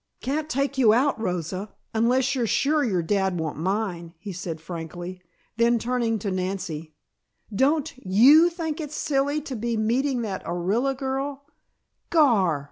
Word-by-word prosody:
"Can't 300 +4 -2
take 275 -1 -1
you 220 -4 +6
out, 260 -2 +1
Rosa, 185 +1 -3 0.2
unless 250 +3 +2
you're 245 -4 0
sure 295 +6 +2
your 190 -9 0
dad 190 +1 0
won't 155 -2 -3
mind," 180 -2 -2
he 195 +3 -7
said 170 -2 -5
frankly. 175 +2 -7 0.4
Then 235 +1 +4
turning 235 -1 0
to 200 -1 -3
Nancy, 180 -4 -4 0.6
"Don't 290 +7 +2
you 265 - +6
think 330 -2 -4
it's 300 -1 -6
silly 285 +1 0
to 275 -3 -6
be 230 0 -2
meeting 245 +3 +1
that 195 -4 -4
Orilla 200 +11 0
girl 270 +1 -3 0.3
" - - -51
"Gar!" 200 - +4
225 Hz, 150 wpm, -25 LUFS, 185-275 Hz, 0.6 s, you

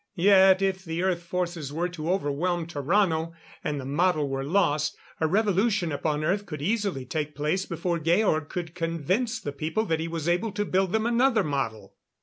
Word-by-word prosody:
Yet 190 0 +6
if 190 -1 0
the 165 0 -3
Earth 185 -2 +1
forces 170 -4 -3
were 170 +4 -1
to 170 -1 -3
overwhelm 175 0 0
Tarrano, 165 +1 0 0.3
and 145 -1 -2
the 130 - -6
model 155 +1 +1
were 135 0 -2
lost, 150 -2 +1 0.2
a 160 - +2
revolution 200 -1 +1
upon 150 +1 -1
Earth 200 +5 0
could 155 -4 -6
easily 195 - -1
take 150 +2 -3
place 155 +6 -1
before 175 -2 -2
Georg 165 -1 +2
could 170 -3 -5
convince 180 - -1
the 145 - -4
people 160 +10 -1
that 160 -5 0
he 165 - -2
was 165 -1 -4
able 180 +5 +1
to 205 0 -1
build 190 -1 +1
them 220 +1 +1
another 235 -2 +3
model. 115 - -3
170 Hz, 180 wpm, -26 LUFS, 150-195 Hz, 0.3 s, Yet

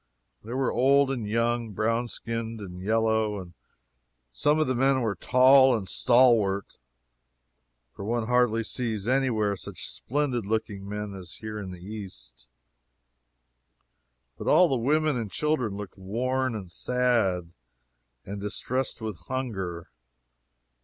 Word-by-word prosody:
There 120 +4 -5
were 135 -1 +1
old 135 +2 +4
and 120 -6 -3
young, 115 0 0
brown 115 +4 0
skinned 115 +1 -5
and 90 -3 -8
yellow. 110 -3 0 0.8
Some 150 - +2
of 155 - +3
the 130 - 0
men 135 +1 +2
were 110 -4 0
tall 130 +5 +5
and 95 -3 -6
stalwart, 115 -6 +3 1.2
(for - - -7
one 115 +2 -1
hardly 120 -2 +2
sees 110 -2 -3
any 135 +1 +2
where 105 -3 0
such - - -7
splendid 135 -3 -1
looking 100 -1 -3
men 105 0 -4
as 90 -3 -9
here 110 -1 -6
in 95 -2 -6
the 90 -1 -10
East,) 65 - -8 1.9
but - - -6
all 175 +4 +6
the 135 - +1
women 150 +3 +1
and 115 -3 -3
children 130 - 0
looked 100 -1 -8
worn 125 +5 -1
and 95 -5 -7
sad, 100 -7 0 0.7
and 100 +1 -6
distressed 125 +5 -2
with 110 -6 -5
hunger. 95 -10 -4
115 Hz, 130 wpm, -27 LUFS, 100-125 Hz, 1.9 s, all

